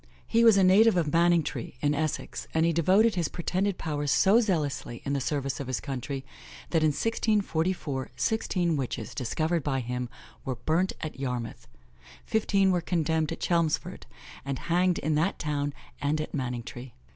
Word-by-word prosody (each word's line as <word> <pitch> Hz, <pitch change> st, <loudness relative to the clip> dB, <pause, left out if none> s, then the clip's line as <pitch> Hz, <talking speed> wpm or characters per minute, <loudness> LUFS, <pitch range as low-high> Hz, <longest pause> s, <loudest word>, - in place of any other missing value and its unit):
He 230 Hz, 0 st, +3 dB
was 225 Hz, -3 st, +7 dB
a 195 Hz, -, +5 dB
native 195 Hz, +2 st, +6 dB
of 155 Hz, -4 st, +1 dB
Manningtree, 165 Hz, -8 st, +1 dB
in 145 Hz, +1 st, +1 dB
Essex, 155 Hz, 0 st, -3 dB
and 160 Hz, 0 st, +3 dB
he 170 Hz, -, +2 dB
devoted 190 Hz, +7 st, +4 dB
his 175 Hz, -5 st, 0 dB
pretended 185 Hz, +3 st, -1 dB
powers 145 Hz, -2 st, -2 dB
so 200 Hz, +10 st, +5 dB
zealously 150 Hz, -, -2 dB
in 140 Hz, -, -1 dB
the 140 Hz, -, 0 dB
service 140 Hz, -1 st, -2 dB
of 140 Hz, -, -5 dB
his 130 Hz, -3 st, -1 dB
country, 135 Hz, 0 st, -5 dB, 0.5 s
that 165 Hz, -, +2 dB
in 155 Hz, -, +4 dB
1644, 175 Hz, -6 st, 0 dB
sixteen 180 Hz, -7 st, 0 dB
witches, 120 Hz, -5 st, -4 dB
discovered 155 Hz, +7 st, -1 dB
by 135 Hz, -2 st, -1 dB
him, 125 Hz, 0 st, -3 dB, 0.3 s
were 130 Hz, -, -3 dB
burnt 160 Hz, +10 st, 0 dB
at 155 Hz, -3 st, -6 dB
Yarmouth; 125 Hz, -4 st, -4 dB, 0.6 s
fifteen 200 Hz, -3 st, +2 dB
were 180 Hz, -1 st, +1 dB
condemned 160 Hz, -2 st, 0 dB
at -, -, -6 dB
Chelmsford, 170 Hz, -3 st, 0 dB, 0.4 s
and 135 Hz, 0 st, -3 dB, 0.2 s
hanged 180 Hz, 0 st, +3 dB
in 155 Hz, +2 st, -1 dB
that 160 Hz, +6 st, +1 dB
town 145 Hz, -1 st, -2 dB, 0.3 s
and 145 Hz, +2 st, 0 dB
at 155 Hz, -, -4 dB
Manningtree. 125 Hz, -2 st, -5 dB
155 Hz, 165 wpm, -28 LUFS, 135-180 Hz, 0.6 s, was